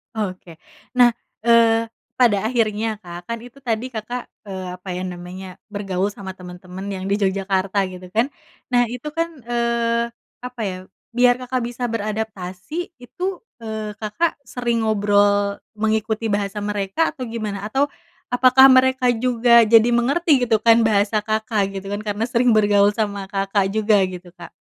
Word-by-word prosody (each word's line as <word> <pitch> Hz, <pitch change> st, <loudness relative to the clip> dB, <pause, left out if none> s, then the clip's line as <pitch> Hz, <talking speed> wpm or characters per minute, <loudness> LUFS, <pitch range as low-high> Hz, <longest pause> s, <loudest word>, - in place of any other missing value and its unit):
Oke 185 Hz, -5 st, -5 dB, 0.4 s
nah, 245 Hz, -1 st, +6 dB, 0.3 s
eee, 230 Hz, -1 st, +4 dB, 0.2 s
pada 235 Hz, -5 st, +4 dB
akhirnya 220 Hz, -2 st, 0 dB
Kak 175 Hz, 0 st, -9 dB
kan 230 Hz, 0 st, -3 dB
itu 245 Hz, +3 st, -14 dB
tadi 235 Hz, -2 st, -2 dB
Kakak, 240 Hz, +2 st, -6 dB, 0.2 s
eee, 190 Hz, -2 st, -5 dB
apa 185 Hz, -, -10 dB
ya 185 Hz, -, -3 dB
namanya 180 Hz, +1 st, -8 dB
bergaul 200 Hz, -2 st, -2 dB
sama 200 Hz, -2 st, -7 dB
teman-teman 180 Hz, +1 st, -10 dB
yang 190 Hz, -2 st, -4 dB
di 200 Hz, +1 st, +1 dB
Yogyakarta 195 Hz, 0 st, 0 dB
gitu 180 Hz, 0 st, -10 dB
kan 245 Hz, +5 st, +2 dB, 0.4 s
nah 245 Hz, -1 st, +3 dB
itu 250 Hz, +5 st, -7 dB
kan, 330 Hz, +1 st, -1 dB
eee, 235 Hz, 0 st, 0 dB, 0.3 s
apa 250 Hz, -1 st, -7 dB
ya 185 Hz, -2 st, -3 dB, 0.4 s
biar 245 Hz, 0 st, +5 dB
Kakak 255 Hz, 0 st, -2 dB
bisa 245 Hz, +1 st, -6 dB
beradaptasi 215 Hz, -, -4 dB
itu, 250 Hz, +8 st, -10 dB, 0.4 s
eee, 220 Hz, -1 st, -5 dB
Kakak 225 Hz, +10 st, -1 dB
sering 235 Hz, -2 st, -1 dB
ngobrol 205 Hz, -1 st, +2 dB, 0.2 s
mengikuti 220 Hz, 0 st, -1 dB
bahasa 205 Hz, 0 st, -1 dB
mereka 205 Hz, +9 st, 0 dB
atau 270 Hz, -5 st, -7 dB
gimana? 215 Hz, -3 st, -4 dB
Atau 275 Hz, +6 st, +1 dB, 0.4 s
apakah 255 Hz, +2 st, +7 dB
mereka 260 Hz, 0 st, +4 dB
juga 235 Hz, 0 st, +4 dB
jadi 230 Hz, +1 st, +6 dB
mengerti 275 Hz, +2 st, +2 dB
gitu 220 Hz, -2 st, +3 dB
kan 230 Hz, 0 st, +6 dB
bahasa 210 Hz, 0 st, +2 dB
Kakak 215 Hz, -2 st, -1 dB
gitu 195 Hz, -, -11 dB
kan 205 Hz, +1 st, -3 dB
karena 205 Hz, +2 st, -1 dB
sering 240 Hz, 0 st, +3 dB
bergaul 205 Hz, -1 st, +4 dB
sama 200 Hz, -3 st, -2 dB
Kakak 195 Hz, 0 st, +1 dB
juga 215 Hz, 0 st, +3 dB
gitu 180 Hz, -1 st, -9 dB
Kak? -, -, -11 dB
220 Hz, 150 wpm, -21 LUFS, 200-240 Hz, 0.4 s, apakah